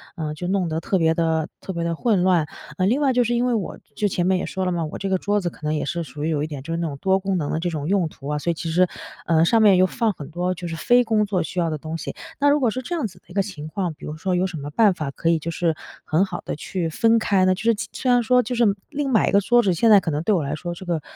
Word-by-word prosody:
呃， 155 -4 -3
就 175 +4 -5
弄 185 -2 0
得 160 0 -1
特 190 +3 0
别 160 -2 +3
地 160 -1 0
特 190 - -6
别 170 -1 -2
地 170 0 -1
混 200 0 +1
乱。 175 -5 +3 0.3
呃， 185 - +2
另 245 +9 +2
外 275 -2 +3
就 250 -1 +3
是 240 +1 0
因 240 +1 +1
为 250 - +1
我 210 -6 -2 0.2
就 210 - +1
前 175 -2 -1
面 185 0 +3
也 - - -2
说 190 0 -3
了 180 - 0
嘛， 170 -2 -1
我 155 - -6
这 195 - -3
个 190 - +2
桌 205 +2 0
子 175 - -1
可 - - -18
能 150 +1 0
也 150 - -1
是 170 +5 -2
属 145 0 -7
于 160 - 0
有 150 -3 0
一 - - -2
点 145 -4 -7
就 165 - -6
是 - - -1
那 170 -1 -1
种 140 - -6
多 190 0 +3
功 190 -1 -1
能 145 -3 -2
的 160 - -1
这 175 +2 -1
种 155 -3 -4
用 195 -4 +2
途 145 -2 -9
啊， 150 - -1
所 170 - -2
以 - - +3
其 165 +1 -5
实 180 +2 +4 0.4
呃， 165 -1 +3
上 225 +6 +4
面 205 -3 +7
又 185 +1 +5
放 225 +2 0
很 145 -5 -9
多 180 +2 -1
就 180 0 -8
是 165 - -4
非 245 +9 +4
工 220 -2 +2
作 190 -4 0
需 180 - -4
要 170 -1 +1
的 155 - -2
东 160 +2 -5
西。 - - -6 0.2
那 285 +1 +4
如 290 +1 +4
果 240 -4 +2
是 255 +4 -4
这 345 +8 -4
样 310 -8 -1
子 190 - -8
的 - - -43
一 175 - -13
个 195 - +2
情 155 -7 -7
况 175 0 -3
比 - - -12
如 150 - -5
说 185 +4 -2
有 180 +1 +1
什 180 - -8
么 145 0 -6
办 205 +5 +4
法 150 -5 -4
可 165 - -4
以 165 - +3
就 170 +2 -4
是 165 -1 0 0.3
很 160 +5 +2
好 - - -6
地 - - -3
去 - - -10 0.2
分 225 +7 +3
开 195 -3 +2
呢？ 185 0 +3
就 - - -8
是 230 0 +4
其 215 0 -5
虽 255 - -2
然 245 0 +5
说 250 +2 +4
就 245 - -3
是 240 - +3 0.3
另 290 -2 -2
买 225 -5 +3
一 - - +1
个 200 - +4
桌 240 +4 +4
子 190 - +2
现 225 +7 +3
在 210 -2 +8
可 170 - -3
能 145 +1 -1
对 215 - +2
我 165 - 0
来 140 +2 -3
说 175 +2 -5
这 190 - -10
个， 170 -3 -1
180 Hz, 370 characters per minute, -23 LUFS, 160-210 Hz, 0.4 s, 在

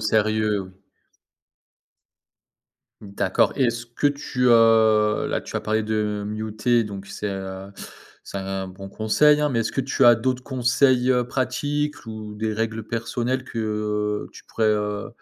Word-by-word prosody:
sérieux. 110 -2 +1 2.3
D'accord 100 -2 0
et 135 - +2
est-ce 120 0 -1
que 120 +5 -1
tu, 140 -3 -1
heu, 110 -2 +4
là, - - -1
tu - - -6
as - - -1
parlé 110 +1 0
de 105 -1 -1
muter 110 +2 0
donc 100 -2 -7
c'est, 105 - -5
heu, 95 0 -6 0.5
c'est 100 - -6
un 95 0 -4
bon 95 +1 -10
conseil, 145 +9 +3
hein 150 - +2
mais 125 -5 -1
est-ce 110 - -2
que - - 0
tu 135 0 +1
as 120 0 +9
d'autres 125 +2 -2
conseils, 125 0 +2
heu, 125 -2 +2
pratiques 145 +3 -2
ou 110 -1 -7
des 110 +1 -2
règles 110 0 -2
personnelles 120 +3 -2
que, 120 - -8
heu, 105 -1 -2
tu - - -14
pourrais, 110 - -1
heu, 105 -1 -1
110 Hz, 155 wpm, -23 LUFS, 105-125 Hz, 2.3 s, as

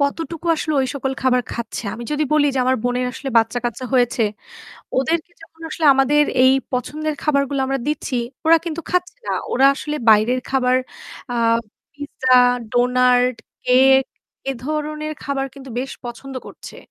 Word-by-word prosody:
কতটুকু 325 +4 -2
আসলে 310 - -2
ঐ - - +2
সকল 270 -1 -2
খাবার 250 -1 +3
খাচ্ছে। 235 0 -5
আমি 235 - -8
যদি 300 +1 +1
বলি 300 -1 +4
যে - - 0
আমার 260 +1 +2
বোনের 245 0 0
আসলে 270 - -6
বাচ্চা-কাচ্চা 240 +2 -2
হয়েছে। 245 0 +2 0.7
ওদেরকে 325 +6 0
যখন 325 0 -18
আসলে 315 0 0
আমাদের 275 +3 +4 0.2
এই 260 - +6 0.2
পছন্দের 305 +5 -2
খাবারগুলা 280 -2 +1
আমরা 270 0 -1
দিচ্ছি, 290 -2 -3 0.3
ওরা 330 +1 +7
কিন্তু 335 -1 -4
খাচ্ছে 360 +2 0
না। - - -1 0.2
ওরা 265 +2 +5
আসলে 300 +2 -4
বাইরের 220 +4 +4
খাবার 255 -1 +2 0.6
আ - - -2 0.6
পিজ্জা, 280 -3 -2 0.4
ডোনাট, 250 0 +3 0.3
কেক 265 +1 +5 0.5
এ - - +2
ধরনের 305 +1 -3
খাবার 270 -1 -2
কিন্তু 270 -1 -11
বেশ 270 - -5
পছন্দ 245 +3 -8
করছে। - - -11
270 Hz, 155 wpm, -20 LUFS, 250-300 Hz, 0.7 s, ওরা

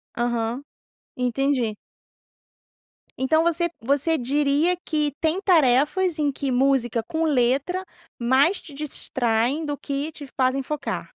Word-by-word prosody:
Aham. 240 +2 -1 0.5
Entendi. 250 -2 0 1.4
Então 315 +5 +2
você 340 0 +1
você 285 +6 +1
diria 290 +6 +1
que 300 -2 0
tem 325 +4 +1
tarefas 320 +1 +3
em 290 -2 +2
que 275 0 -3
música 245 -3 +2
com 325 -1 -2
letra 285 +6 +1 0.3
mais 265 +10 +3
te 300 - -13
distraem 265 -1 -1
do 290 -1 -3
que 285 +2 -3
te 290 -2 -10
fazem 260 +1 +1
focar? 300 +2 -4
280 Hz, 120 wpm, -24 LUFS, 255-315 Hz, 1.4 s, tarefas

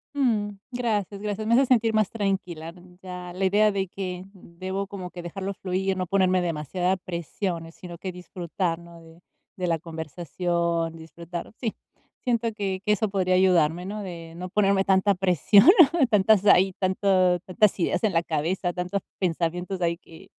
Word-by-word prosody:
Mm. 220 -7 +1 0.2
Gracias, 210 -5 -2
gracias, 210 +1 -3
me 230 - +3
haces 265 +1 +5
sentir 230 -3 +3
más 215 -3 +2
tranquila, 185 -6 -3
mm. 180 0 -18
Ya, 180 -1 -7
la 190 +2 -1
idea 210 +2 +4
de 195 -1 -1
que 185 -1 -5
debo 190 +1 -6
como 185 -3 -7
que 175 - -8
dejarlo 195 +3 -5
fluir, 190 0 -2
no 185 -1 -2
ponerme 185 -1 +2
demasiada 175 +3 -1
presiones, 170 -1 -5
sino 175 -1 -10
que 185 +2 -5
disfrutar, 175 -1 -3
¿no?, 170 -1 -14
de 165 0 -17 0.4
de 180 -1 -2
la 165 - +1
conversación, 165 +1 -2
disfrutar 170 +3 -8
Sí, 225 -4 -2 0.5
siento 235 -2 +1
que 195 -3 -3
que 210 - +2
eso 210 0 0
podría 185 -2 +1
ayudarme, 180 -2 +3
¿no?, 210 +2 -5
de 170 -3 -8
no 180 +2 -6
ponerme 195 0 +2
tanta 195 +1 +3
presión, 190 - +4 0.4
tantas, 210 -1 +4
ahí, 190 -1 +5
tanto 185 -1 +2
tantas 190 +3 +2
ideas - - 0
en 205 - +1
la 165 0 +2
cabeza, 175 +4 -1
tantos 180 +2 -2 0.2
pensamientos 180 +1 -1
ahí 170 0 +1
que 165 -2 -16
185 Hz, 170 wpm, -25 LUFS, 170-200 Hz, 0.5 s, haces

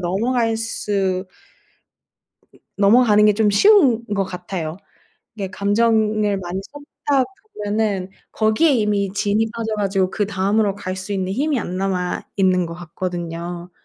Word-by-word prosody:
넘어갈 225 +6 0
수 200 -4 -2 1.5
넘어가는 210 +1 +5
게 210 - +4
좀 215 -1 +2
쉬운 265 - +5
것 195 -1 +1
같아요. 180 -3 -5 0.6
이게 195 -3 -4
감정을 210 0 +1
많이 185 +1 -4
쏟다 290 -2 -1 0.4
보면은 205 -3 -1 0.2
거기에 220 +9 +3
이미 210 -4 +1
진이 205 +2 +1
빠져 225 -1 -3
가지고 195 -2 0
그 205 - -1
다음으로 200 +1 +1
갈 185 -2 -5
수 190 +2 -5
있는 190 -1 -2
힘이 280 +4 0
안 185 -4 -4
남아 185 -2 -1
있는 185 -2 +3
것 170 - -7
같거든요. 175 0 -5
200 Hz, 265 characters per minute, -20 LUFS, 185-220 Hz, 1.5 s, 넘어가는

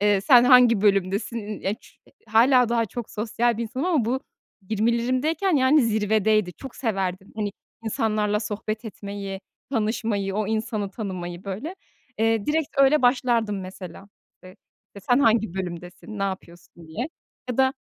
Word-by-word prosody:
eee, 205 -2 +3
sen 245 +2 +6
hangi 250 -4 +6
bölümdesin, 200 +2 +1
ııı, 210 - -6
ya 195 +2 0
ç - - -21 0.3
hâlâ 240 +2 +5
daha 230 -1 +1
çok 235 +3 -7
sosyal 230 +2 0
bir - - -1
insanım 255 +8 -3
ama 310 -11 +2
bu, 255 +3 -1 0.5
20'lerimdeyken 255 - +1
yani, 265 +2 +4
zirvedeydi, 215 -3 +1
çok 270 +6 -11
severdim, 195 -5 -3
hani, 205 -2 -2 0.3
insanlarla 215 -1 0
sohbet 215 +1 -4
etmeyi, 200 -2 -6 0.3
tanışmayı, 215 -4 -1
o 210 -1 -1
insanı 215 -2 -2
tanımayı, 185 -4 -6
böyle. 215 - -5 0.4
Eee, 225 -2 +1
direkt 310 0 0
öyle 275 +1 +5
başlardım, 235 -5 +2
mesela, 185 +1 -9 0.4
eee, 185 +3 -13 0.4
işte, 200 - -10
sen 245 - +6
hangi 220 -7 +2
bölümdesin, 180 +3 -6
ne - - -2
yapıyorsun 175 -3 -7
diye 230 - -3 0.4
ya 245 - -3
da 265 0 +3
215 Hz, 150 wpm, -24 LUFS, 195-245 Hz, 0.5 s, sen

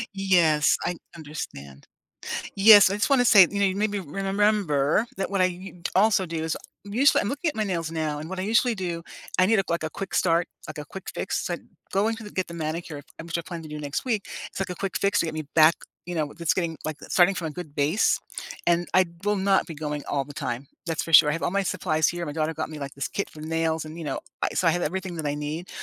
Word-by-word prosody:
Yes, 170 -6 +3
I 180 - -1 0.2
understand. 70 - -8 0.7
Yes, 205 0 +9
I 195 - -1
just 210 - 0
wanna 265 -3 +4
say, 210 -4 +8
you 200 - -3
know, 200 - +4
you 190 -1 0
made 210 +1 0
me 205 - -2
remember 195 -2 +1
that 195 - -2
when 195 -1 +1
I - - +6
u 185 +1 -5
t - - -2
also 195 -1 +4
do 165 -2 -4
is 160 0 -1 0.3
I - - -9
usually 255 +8 +4
I'm 200 - -2
looking 290 +5 -1
at - - -7
my 215 - 0
nails 170 -5 -2
now, 155 -2 -2
and 155 +2 -6
what 190 0 -5
I - - -1
usually 230 +5 +2
do, 175 -4 -4 0.3
I 185 - +5
need 220 +1 +3
a, - - +2
like, 170 -1 -1
a 155 - -2
quick 195 +4 -5
start, 170 0 +2 0.2
like, - - -7
a 150 - -6
quick 190 +6 -8
fix, - - -2
so - - -2
I - - -2 0.4
going 215 +4 +2
to 225 - -10
get 185 - -2
the 170 - -8
manicure, 155 -1 -4 0.2
in 165 - -8
which 170 0 -2
I - - -2
plan 170 -1 -7
to 155 - -10
do 150 0 -6
next 145 -1 -3
week, 225 -6 -1 0.2
it's - - -8
like 195 - -2
a - - -5
quick 195 +2 -2
fix 200 +1 +2
to - - +2
get 160 - -4
me 155 - -3
back, 160 +1 +7 0.3
you 175 - -4
know, 150 -3 -2
that's 170 -2 +1
getting, 170 -3 -1
like, 155 0 -3
uh, - - -7
starting 185 +2 +4
from 170 -3 -3
a - - -5
good 155 -2 -8
base. 150 +8 +2 0.5
And 175 0 +2
I 185 0 +6 0.2
will 205 0 +2
not 195 0 +2
be 165 - -7
going 150 -1 -4
all 140 -1 0
the 145 - -11
time, 125 0 -4 0.2
that's 165 -1 -1
for 165 - -7
sure. 150 0 +9
I - - +1
have 165 - -4
all - - 0
my 200 +1 +1
supplies 155 -4 +1
here, 175 0 -2
my 150 - -4
daughter 155 +1 -1
got - - -3
me, 155 - -7
like, 140 -1 -6
this 140 - -2
kit 200 - -3
for 155 - -12
nails 160 0 -1
and, 155 +1 -9
you - - -5
know, 140 - -2 0.2
I - - +1
so 180 - +2
I - - +6
have 175 - -1
everything 185 +2 -3
that 160 - -4
I 145 - -1
need. 150 +4 -5
170 Hz, 275 wpm, -25 LUFS, 155-195 Hz, 0.7 s, Yes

